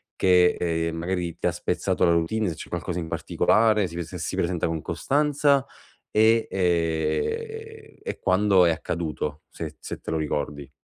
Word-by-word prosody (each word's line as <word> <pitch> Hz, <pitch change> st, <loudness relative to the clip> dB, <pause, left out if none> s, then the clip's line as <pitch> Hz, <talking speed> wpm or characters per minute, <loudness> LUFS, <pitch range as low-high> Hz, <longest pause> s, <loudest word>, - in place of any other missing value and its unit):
che, 90 Hz, -1 st, +4 dB
ehm, 80 Hz, -1 st, -1 dB
magari 85 Hz, -1 st, -2 dB
ti -, -, -1 dB
ha -, -, +2 dB
spezzato 85 Hz, -, -1 dB
la 85 Hz, -, +4 dB
routine, 90 Hz, +6 st, +1 dB
se 80 Hz, -, -4 dB
c'è -, -, -9 dB
qualcosa 90 Hz, +1 st, -3 dB
in 80 Hz, -, -4 dB
particolare, 105 Hz, -3 st, +2 dB
si 85 Hz, -, -10 dB
prese 85 Hz, +1 st, -5 dB
si 80 Hz, -, -3 dB
presenta 85 Hz, -1 st, 0 dB
con 80 Hz, -1 st, -2 dB
costanza 140 Hz, -, +2 dB, 0.5 s
e, 110 Hz, +1 st, +4 dB
ehm, 95 Hz, -, -1 dB
e -, -, -5 dB
quando 95 Hz, -1 st, +4 dB
è 85 Hz, -, +4 dB
accaduto? 80 Hz, -2 st, -3 dB
Se -, -, -7 dB
se -, -, -7 dB
te -, -, -7 dB
lo 80 Hz, -, 0 dB
ricordi. 75 Hz, -2 st, -3 dB
90 Hz, 165 wpm, -25 LUFS, 80-110 Hz, 0.5 s, che